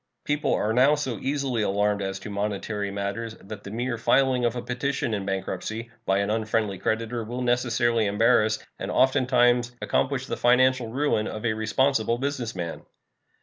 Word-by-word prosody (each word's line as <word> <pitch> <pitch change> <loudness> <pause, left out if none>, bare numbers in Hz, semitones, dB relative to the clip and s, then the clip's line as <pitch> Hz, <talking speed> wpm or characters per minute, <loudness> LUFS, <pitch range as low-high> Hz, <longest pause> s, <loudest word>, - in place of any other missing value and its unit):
People 150 0 0
are 110 +1 0
now 135 +5 +5
so 130 -7 -3
easily 135 -4 -1
alarmed 105 0 +1
as 95 0 -3
to 105 - -7
monetary 100 0 -2
matters 100 +3 -4
that 105 +2 -9
the - - -8
mere 120 +2 -3
filing 130 0 +3
of 120 0 0
a 120 - -3
petition 125 -1 -2
in 100 -2 -3
bankruptcy 110 +4 -4 0.2
by 95 - +3
an 100 +1 0
unfriendly 110 -3 -1
creditor 115 +1 -1
will 120 +3 -4
necessarily 120 -2 +2
embarrass, 110 +1 +3 0.2
and - - -4
oftentimes 125 -2 +3
accomplish 130 -1 0
the - - -3
financial 125 0 +3
ruin, 125 -3 0
of 110 +2 -5
a 110 - +2
responsible 115 +1 +1
business 130 -4 -3
man. 85 -2 -4
115 Hz, 165 wpm, -25 LUFS, 105-125 Hz, 0.2 s, now